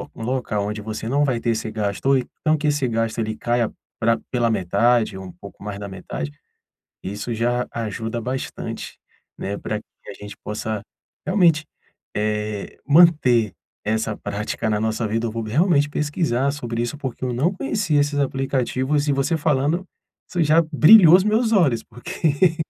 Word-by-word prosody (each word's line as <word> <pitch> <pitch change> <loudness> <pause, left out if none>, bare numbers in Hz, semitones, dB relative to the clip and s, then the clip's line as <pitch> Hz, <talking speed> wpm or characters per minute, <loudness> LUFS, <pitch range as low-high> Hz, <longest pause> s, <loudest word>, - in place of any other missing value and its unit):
local 115 -3 -2
onde 105 0 -4
você 110 +1 -5
não 140 +4 +2
vai 130 -5 +1
ter 115 - 0
esse 110 0 -2
gasto 105 +2 -2
oi 130 -3 +3
então 155 0 +2
que 150 0 -1
esse 145 -3 +1
gasto 115 0 -1
ele 110 -1 -2
caia 120 -1 0 0.3
pra 115 0 +3
pela 120 -2 +1
metade 110 +3 +2
ou 95 - -7
um 90 - -9
pouco 100 +3 -13
mais 100 -1 -5
da 100 - -6
metade, 90 -6 -6 0.7
isso 105 +5 -4
já 120 +2 0
ajuda 115 +1 -4
bastante, 130 +3 -5 0.4
né, 100 +1 -3
pra - - -3
que - - -15
a - - -8
gente 105 0 -10
possa 105 0 -4 0.4
realmente, 170 -6 +3 0.5
eh, 105 -1 -2
manter 145 - +5 0.3
essa 110 0 -1
prática 105 +2 -3
na 105 -1 0
nossa 110 +1 -1
vida, 115 +2 -1
eu 115 - -2
vou 115 0 -3
realmente 145 - +2
pesquisar 145 -3 0
sobre 120 -5 -3
isso, 120 +5 -3
porque 130 -2 -5
eu 125 - -1
não 140 +10 +1
conhecia 190 - 0
esses 145 0 0
aplicativos 135 +1 0
e 145 - +2
você 135 +5 +1
falando 150 +3 +1 0.4
isso 175 -2 0
já 155 +2 +5
brilhou 170 +2 +8
os 190 - +1
meus 220 +2 +2
olhos 145 - +3
porque 160 - 0
120 Hz, 170 wpm, -22 LUFS, 110-150 Hz, 0.7 s, brilhou